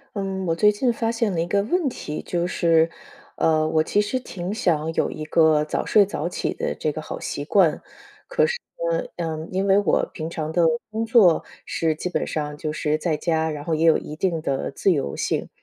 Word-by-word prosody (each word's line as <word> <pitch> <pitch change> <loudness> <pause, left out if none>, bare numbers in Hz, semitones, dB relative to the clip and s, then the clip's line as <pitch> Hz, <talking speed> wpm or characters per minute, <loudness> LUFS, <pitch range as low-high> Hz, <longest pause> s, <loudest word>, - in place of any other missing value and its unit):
嗯， 190 -1 -3
我 165 - +1
最 210 +5 +5
近 240 +4 +1
发 230 -1 -1
现 230 -2 0
了 170 - -1
一 - - 0
个 200 +3 +1
问 340 - 0
题 150 -10 -6
就 175 0 -1
是， 165 -2 +3 0.5
呃， 155 -1 +2
我 155 0 +2
其 205 - +2
实 210 +5 -1
挺 185 -6 -5
想 165 -7 0
有 - - 0
一 155 - -6
个 155 -1 +4
早 150 - -2
睡 205 -2 +5
早 170 -4 -3
起 - - -2
的 - - -2
这 155 - -1
个 155 - -6
好 - - -6
习 145 - -4
惯。 170 -2 +3 1.0
可 - - -1
是 - - 0
呢， - - -10
嗯， 160 -1 -4
因 190 +1 0
为 195 0 +5
我 205 -4 +2
平 160 0 -5
常 155 -2 -4
的 175 0 +3 0.3
工 220 +1 -2
作 220 -8 +5 0.2
是 160 -1 0
基 160 - -4
本 180 - -2
上 150 -1 -3
就 155 -1 -4
是 155 -1 0
在 155 0 -1
家， 160 0 0
然 150 -1 -6
后 165 0 0
也 160 +1 0
有 165 -1 +5
一 150 - -7
定 170 -1 0
的 140 -3 -2
自 165 +7 +1
由 140 - -2
性， - - -1
165 Hz, 240 characters per minute, -23 LUFS, 155-200 Hz, 1.0 s, 最